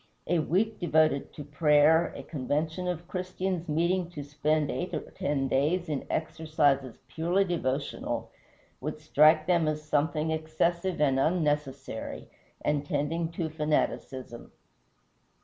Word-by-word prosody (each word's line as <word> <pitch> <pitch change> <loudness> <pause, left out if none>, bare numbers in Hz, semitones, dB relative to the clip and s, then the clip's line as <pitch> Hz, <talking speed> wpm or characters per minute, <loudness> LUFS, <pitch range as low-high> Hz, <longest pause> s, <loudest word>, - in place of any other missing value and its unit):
A 175 +1 +2
week 205 +8 0
devoted 155 -4 +2
to 150 - -7
prayer, 150 +3 +4
a - - -7
convention 155 +5 -2
of 175 -1 -3
Christians 185 -1 -3
meeting 170 +3 +1
to 150 -5 -7
spend 150 +1 0
eight 180 +1 -3
or - - -2
ten 140 -2 -1
days 155 +7 +1
in 145 -3 -3
exercises 150 -5 0
purely 175 +5 +1
devotional, 145 -6 -2 0.5
would 150 +3 -4
strike 155 +1 +5
them 170 -3 +2
as 155 0 -1
something 155 +1 0
excessive 170 +3 -1
and 135 -3 +3
unnecessary, 145 -6 -1 0.4
and 150 -1 +1
tending 155 +2 -1
to 165 -1 -2
fanaticism. 150 -5 -2
155 Hz, 125 wpm, -28 LUFS, 145-170 Hz, 0.5 s, strike